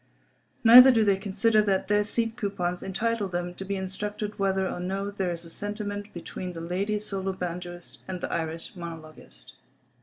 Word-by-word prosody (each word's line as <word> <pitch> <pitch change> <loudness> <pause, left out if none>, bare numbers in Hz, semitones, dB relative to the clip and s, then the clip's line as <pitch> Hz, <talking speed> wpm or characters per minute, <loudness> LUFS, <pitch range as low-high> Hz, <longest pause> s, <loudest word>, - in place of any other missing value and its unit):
Neither 250 +3 +11
do 225 -3 +3
they 200 -1 +4
consider 205 +3 +2
that 195 -3 0
their 205 +1 +3
seat 225 +2 -1
coupons 195 -6 -2
entitle 215 +2 -1
them 175 -1 -3
to 195 - -7
be 200 +1 -3
instructed 205 +2 -4
whether 190 -1 +1
or - - -4
no 195 +3 -3
there 190 -3 -2
is 170 0 -5
a - - -10
sentiment 205 +1 -4
between 180 +1 -6
the 165 - -7
lady 190 +5 -1
solo 195 -2 -3
banjoist 175 -1 -6
and 185 -1 -4
the - - -4
Irish 165 +2 -4
monologist. 155 - -10
195 Hz, 175 wpm, -27 LUFS, 175-205 Hz, -, Neither